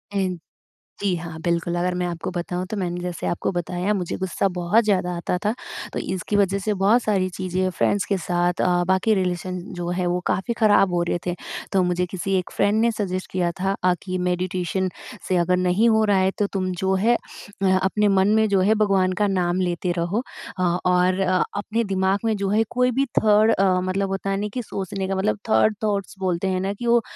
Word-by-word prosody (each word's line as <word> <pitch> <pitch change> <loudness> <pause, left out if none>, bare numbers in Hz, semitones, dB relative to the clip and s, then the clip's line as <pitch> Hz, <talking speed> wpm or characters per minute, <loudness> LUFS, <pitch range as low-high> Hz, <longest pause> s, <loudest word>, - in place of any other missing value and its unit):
ऐन 185 -3 -1 0.6
जी, 195 -3 +1
हाँ। 165 -1 -7
बिल्कुल 170 0 0
अगर 180 +1 0
मैं 180 0 -1
आपको 175 +1 -4
बताऊँ 180 0 -3
तो 215 - -2
मैंने 175 -2 -2
जैसे 180 -1 -4
आपको 170 - -1
बताया 180 +3 -1
मुझे 180 -4 -2
गुस्सा 190 +1 0
बहुत 180 +6 +3
ज़्यादा 190 -4 +1
आता 170 +1 -1
था। 210 - +2 0.4
तो - - -2
इसकी 190 +2 -3
वज़ह 200 -1 +2
से 210 +2 -1
बहुत 220 +5 +4
सारी 195 -3 +1
चीज़ें 185 0 -2
फ्रेंड्स 195 +2 0
के 200 - 0
साथ 175 0 0
अ, 175 -1 +2
बाकी 190 +4 +3
रिलेशन 185 -1 -2
जो 175 -1 -4
है 180 +1 -1
वो 175 0 0
काफ़ी 190 +6 0
ख़राब 205 -4 +4
हो 175 - +2
रहे - - +1
थे। 175 -1 -1 0.4
तो 190 -2 +3
मुझे 180 0 0
किसी 190 +2 -4
1 180 - -7
फ्रेंड 205 +2 +2
ने 235 0 +3
सज़ेस्ट 185 -4 -4
किया 175 -2 0
था 195 +1 0
अ, 180 0 +4
कि 185 -1 -3
मेडिटेशन 180 +1 -1 0.4
से 185 - +2
अगर 175 +1 +2
नहीं 185 +5 +3
हो 220 -1 +3
रहा 205 -2 +3
है 190 0 +2
तो 205 - +2
तुम 185 -1 -1
जो 190 0 +1
है 240 +1 +5
अ, 200 -3 -7 0.2
अपने 210 +2 +2
मन 195 -1 +3
में 220 0 +4
जो 195 -2 +3
है 205 +4 +4
भगवान 190 -2 +2
का 205 - +4
नाम 180 -2 0
लेते 175 0 -1
रहो। 175 +7 0 0.4
अ, - - +1
और 180 +1 +2
अ, 185 -1 +2 0.2
अपने 220 +3 -1
दिमाग 190 +1 +1
में 220 -1 +2
जो 195 -1 -1
है 215 +3 +3
कोई 250 0 +2
भी 275 - +3 0.2
थर्ड 215 +1 +5
अ, 190 -1 +3
मतलब 190 +1 -1
होता 195 0 -2
ना, 205 +2 -2
कि 255 - -2
सोचने 195 -2 -4
का 195 - -1
मतलब 105 - 0
थर्ड 110 - +4
थॉट्स 205 -2 -1
बोलते 185 0 -1
हैं 185 -1 0
ना 195 +1 -1
कि, 220 +4 -7
वो 235 0 +5
185 Hz, 220 wpm, -23 LUFS, 180-200 Hz, 0.6 s, है